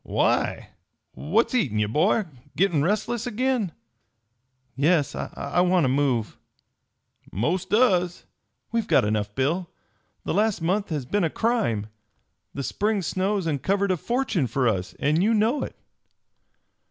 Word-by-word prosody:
"Why? - - 0 0.4
What's 205 - 0
eatin' 140 - +1
ye, 105 - +2
boy? 155 - +2 0.3
Gittin' 175 -5 +2
restless 215 - -1
agin?" 245 -4 0 1.0
"Yes, 150 +1 +2
I 140 +5 -2
want 180 -1 +3
to 130 - +2
move." 130 -5 0 0.9
"Most 175 - -1
does." 185 -6 +2 0.5
"We've 230 -2 -1
got - - +4
enough, 105 -1 -1
Bill. 165 +7 0 0.5
The - - -2
last 215 -2 +1
month 190 +5 0
has 150 -6 -3
been 205 +9 0
a 165 - +2
crime. 215 - 0 0.7
The 140 - -5
spring 205 +5 -1
snows 190 +2 -1
uncovered 190 +7 0
a 185 - +1
fortune 235 - -1
for 125 +2 0
us, 95 -4 -1
and 150 +4 +1
you 220 +4 +3
know 225 +7 +2
it!" - - -5
180 Hz, 135 wpm, -25 LUFS, 140-210 Hz, 1.0 s, got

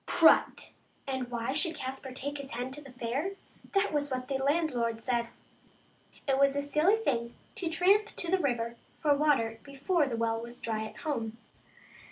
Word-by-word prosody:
Prut! 325 - +4 0.3
And 260 -2 -3
why 240 +1 -2
should 325 +3 +4
Caspar 265 0 -5
take 285 +3 -4
his 275 -1 -7
hen 250 +2 -3
to 295 +3 -4
the 275 -2 -12
fair? 255 +10 -2 0.4
That 395 -3 +2
was 290 -1 0
what 255 0 -3
the 270 -1 0
landlord 270 -7 +1
said. 235 0 0 1.0
It 270 -1 +2
was 275 0 +4
a 285 - +1
silly 305 +8 +3
thing 235 - -1 0.2
to 345 - -3
tramp 390 +6 +4
to 350 -5 -3
the 380 - +3
river 235 -6 -1 0.2
for 295 -2 +4
water 270 -7 +2
before 285 +3 0
the 235 -3 -2
well 225 0 0
was 235 +1 -8
dry 220 -1 -2
at - - -10
home. 230 -7 -2
270 Hz, 180 wpm, -30 LUFS, 235-300 Hz, 1.0 s, Prut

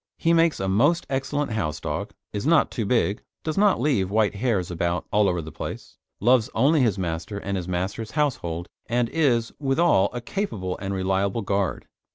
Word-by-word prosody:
He 165 - +2
makes 165 -1 +3
a 95 - -1
most 140 - +3
excellent 135 +1 -1
house 80 -9 -2
dog, - - -4 0.2
is 105 +6 -2
not 165 -1 +4
too 110 -5 -2
big, 110 -3 +1 0.2
does 155 - -2
not 200 - +4
leave 120 -9 +1
white 105 0 +2
hairs 100 -5 -1
about 85 0 -1
all 105 -1 +4
over 90 -2 -1
the 80 - -8
place, - - -7 0.2
loves 120 +1 +3
only 140 +6 +4
his 110 -6 +2
master 90 +3 -3
and 100 0 -3
his 90 -2 -3
master's 95 +5 -3
household, 85 - -1 0.2
and 120 0 +1
is, 120 -8 +1
withal, 135 - +3
a 125 - -4
capable 115 - -3
and 100 0 -3
reliable 95 +3 0
guard. 100 -1 -1
110 Hz, 185 wpm, -24 LUFS, 95-135 Hz, 0.2 s, not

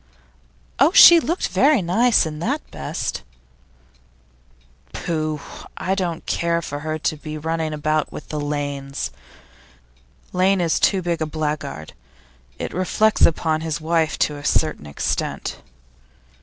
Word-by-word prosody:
'Oh, 280 +6 +5
she 345 -3 +10
looked 335 +3 -2
very 280 -7 +3
nice, 225 +5 +3
in 150 -1 -5
that 275 - -2
best.' 70 - -4 1.7
'Pooh! 155 -2 -2
But - - -12
I 190 - -1
don't 180 -4 -3
care 170 0 0
for 145 -1 -5
her 155 +1 -3
to 155 +1 -1
be 155 +1 -7
running 160 0 -2
about 155 0 -1
with - - -9
the 150 - -3
Lanes. 145 -1 -3 1.2
Lane 190 +1 +3
is 170 -2 +1
too 190 -3 +2
big 170 -1 -2
a 155 - 0
blackguard; 150 - -4 0.6
it - - -5
reflects 210 +4 +3
upon 160 -1 -1
his 160 -1 -3
wife 160 -1 0
to 150 - 0
a 145 - -10
certain 155 - 0
extent. 70 - -3
160 Hz, 135 wpm, -21 LUFS, 150-180 Hz, 1.7 s, she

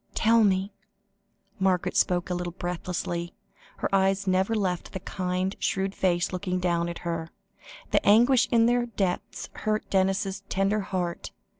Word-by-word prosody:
"Tell 225 0 +4
me." 195 0 +1 0.9
Margaret 190 -2 +1
spoke 180 0 +1
a - - +1
little 175 -1 -3
breathlessly; 175 -1 -4 0.4
her - - -2
eyes 195 +1 +2
never 190 +3 +1
left 185 -4 -2
the 190 - -3
kind, 185 +1 -2
shrewd 195 0 -1
face 175 -3 0
looking 185 0 -2
down 170 -1 0
at 170 - -5
her; 165 -1 -3 0.6
the - - +3
anguish 240 +5 +5
in 230 -1 +5
their 240 0 +2
depths 195 -5 -3
hurt 215 0 -2
Denis's 195 +1 +1
tender 195 +2 +1
heart. 180 -3 -3
190 Hz, 145 wpm, -27 LUFS, 180-200 Hz, 0.9 s, anguish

